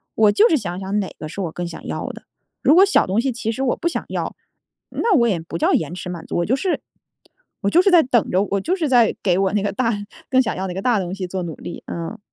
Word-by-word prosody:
我 215 -2 +5
就 435 - +5
是 320 - +4
想 180 -7 -4
想 195 +2 -1
哪 190 - -2
个 155 - -7
是 185 - -8
我 170 - -3
更 175 +2 -4
想 170 - -9
要 - - -3
的， - - -10 0.4
如 300 - +5
果 385 +3 +8
小 400 - +3
东 195 +4 +1
西 265 +1 0
其 225 -1 -3
实 265 - -3
我 255 - +1
不 340 - -1
想 340 - -2
要， - - -3 0.5
那 455 -4 +1
我 235 -6 +4
也 180 - 0
不 165 +1 -6
叫 - - +2
延 160 +2 0
迟 180 0 -6
满 170 -2 -6
足， - - -5
我 170 - +1
就 245 - 0
是 365 +5 -1 0.8
我 200 - +1
就 350 - +5
是 395 - +3
在 350 -4 +6
等 245 -3 +1
着， 185 +2 +3
我 200 -1 -1
就 360 - 0
是 325 -6 -1
在 240 -4 +4
给 180 -2 +2
我 195 0 +1
那 205 - +1
个 205 - 0
大 230 +2 0 0.4
更 260 0 +4
想 225 - -1
要 190 +1 -2
那 180 - -4
个 190 - -4
大 235 -3 +2
东 185 0 -4
西 195 -2 -4
做 185 +1 -4
努 165 -2 -5
力， - - -8
嗯。 170 +6 -5
205 Hz, 305 characters per minute, -21 LUFS, 180-260 Hz, 0.8 s, 果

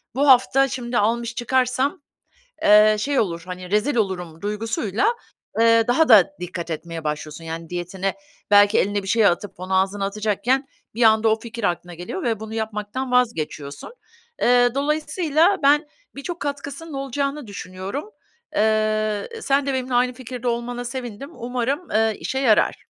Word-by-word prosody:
bu 280 +2 +2
hafta 265 +1 +5
şimdi 245 -2 -3
almış 235 +2 0
çıkarsam, 255 +3 0 0.6
eee, 210 +1 +7
şey 280 +5 0
olur, 170 -5 -1
hani, 180 0 -8
rezil 210 +7 +1
olurum 180 -7 -2
duygusuyla, 215 - -1 0.5
eee, 230 0 +5
daha 285 +6 +3
da 205 -6 +7
dikkat 175 -1 -5
etmeye 165 +1 -5
başlıyorsun, 150 +1 -4
yani, 165 0 -6
diyetine. 180 +2 -3 0.4
Belki 205 +1 +6
eline 205 0 0
bir - - -8
şey 220 +2 +3
atıp 195 +2 +1
onu 185 +1 -2
ağzına 195 +1 -2
atacakken 215 +6 0 0.3
bir 235 - +1
anda 220 0 +5
o 220 0 +1
fikir 235 0 -8
aklına 175 -1 -2
geliyor 180 - -6
ve 230 -5 0
bunu 220 0 -7
yapmaktan 220 +3 -4
vazgeçiyorsun. 155 - -1 0.5
Eee, 245 0 +5
dolayısıyla 310 +5 +1
ben 295 +2 +4 0.3
birçok 340 +5 -6
katkısının 285 +2 -5
olacağını 275 0 -3
düşünüyorum. 200 - -6 0.5
Eee, 215 -1 +1
sen 275 -4 +1
de 275 - -1
benimle 260 -1 -3
aynı 250 +1 +2
fikirde 250 0 -7
olmana 240 +1 -2
sevindim, 245 +1 -6
umarım, 250 +5 -3
eee, 220 0 +2
işe 265 - -3
yarar. 230 -6 +2
225 Hz, 150 wpm, -22 LUFS, 200-260 Hz, 0.6 s, eee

